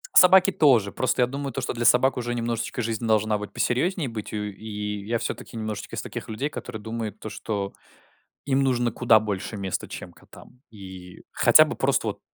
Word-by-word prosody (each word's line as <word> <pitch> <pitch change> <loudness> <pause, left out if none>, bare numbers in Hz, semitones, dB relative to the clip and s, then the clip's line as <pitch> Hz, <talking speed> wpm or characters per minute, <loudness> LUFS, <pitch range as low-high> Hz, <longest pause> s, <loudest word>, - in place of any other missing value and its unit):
Собаки 190 +1 +7
тоже, 125 - +4
просто 130 +2 +1
я - - +2
думаю, 140 +1 -4
то 135 - -3
что 130 - -2
для 120 -1 -3
собак 130 +2 +4
уже 120 0 -2
немножечко 120 +1 -2
жизнь 115 0 -2
должна 110 -1 +2
быть 105 - -7
посерьёзнее 155 +4 0
быть 110 -2 -6
у - - -5
и 105 0 -5
я 115 +1 +1
всё-таки 115 - -5
немножечко 110 -2 -5
из - - -3
таких - - -7
людей, 130 +7 -2
которые 125 -5 -7
думают, 110 -1 -5
то 110 - -6
что 100 -2 -4 0.7
им 135 -1 +2
нужно 120 -3 +1
куда 115 -1 +4
больше 105 0 -4
места, 95 -2 -3
чем - - -8
котам. 125 - -17
И 95 -4 -11
хотя - - +7
бы - - -4
просто - - +1
вот - - -3
115 Hz, 195 wpm, -25 LUFS, 105-125 Hz, 0.7 s, Собаки